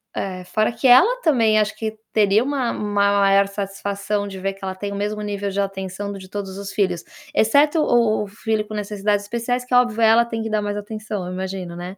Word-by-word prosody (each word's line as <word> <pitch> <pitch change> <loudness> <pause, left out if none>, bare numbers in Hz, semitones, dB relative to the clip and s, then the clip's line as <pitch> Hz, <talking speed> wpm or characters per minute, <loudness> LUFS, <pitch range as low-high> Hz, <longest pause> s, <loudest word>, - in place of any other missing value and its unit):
eh, 185 -2 -4
é, - - -10
fora 215 +4 +1
que 235 +3 0
ela 420 - +6
também 230 -9 +3
acho 215 0 0
que 220 -1 -4 0.2
teria 210 +1 +4
uma 265 -3 -1
uma 205 -1 +1
maior 195 0 +4
satisfação 200 +1 -3
de 195 -1 -7
ver 195 +1 -2
que 195 - -18
ela 190 0 -3
tem 200 +2 -5
o 200 - -4
mesmo 210 +1 -3
nível 205 -1 -3
de 195 - -3
atenção 195 0 -4
do 200 - -7
de 185 -1 -12
todos 195 -1 -5
os 200 0 -6
filhos, 185 -4 0 0.3
exceto 290 +8 +4
o 230 -5 +2
o - - -7
filho 215 +1 -2
com 215 - -8
necessidades 205 0 -1
especiais, 240 +3 -2
que 250 - -6
óbvio, 240 -2 +3
ela 225 +1 +5
tem 225 -1 -4
que 225 - -4
dar 215 -1 0
mais 205 0 -3
atenção, 210 -2 -5
eu 180 - -5
imagino, 185 -2 -5
né. 180 +3 -7
205 Hz, 230 wpm, -21 LUFS, 195-225 Hz, 0.3 s, ela